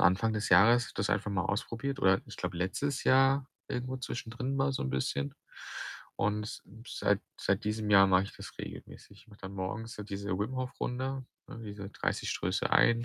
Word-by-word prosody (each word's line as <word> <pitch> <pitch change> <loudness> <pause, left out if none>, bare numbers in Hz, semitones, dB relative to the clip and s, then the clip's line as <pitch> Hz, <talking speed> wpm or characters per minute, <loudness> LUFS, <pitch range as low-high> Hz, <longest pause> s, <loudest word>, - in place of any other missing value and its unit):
Anfang 95 +6 +4
des 105 0 -1
Jahres 115 +7 +6
das - - 0
einfach 105 - +1
mal 100 -2 +1
ausprobiert 120 +7 -2
oder, 95 -3 +5
ich - - -10
glaube, 90 -1 -3
letztes 110 +10 -1
Jahr 135 +1 +5 0.2
irgendwo 125 +1 -2
zwischendrin 125 +1 -3
mal 135 0 +2
so - - -2
'n 65 - -2
bisschen 70 +2 -1 0.8
und 105 0 +1
s 105 - -7 0.4
seit - - +3 0.2
seit - - +1
diesem 105 0 -1
Jahr 100 -1 +8
mache 95 -1 +5
ich 100 - -10
das - - -9
regelmäßig. 100 - -9
Ich - - -26
mache 105 -1 -16
dann 95 0 -6
morgens 110 +5 -4
so 105 - -6
diese 100 -1 -5
Wim-Hof-Runde, 130 +3 -2 0.2
ne, - - -8
diese 100 -1 -7
30 - - -1
Stöße - - 0
ein, 115 0 +5
110 Hz, 185 wpm, -31 LUFS, 100-125 Hz, 0.8 s, Jahr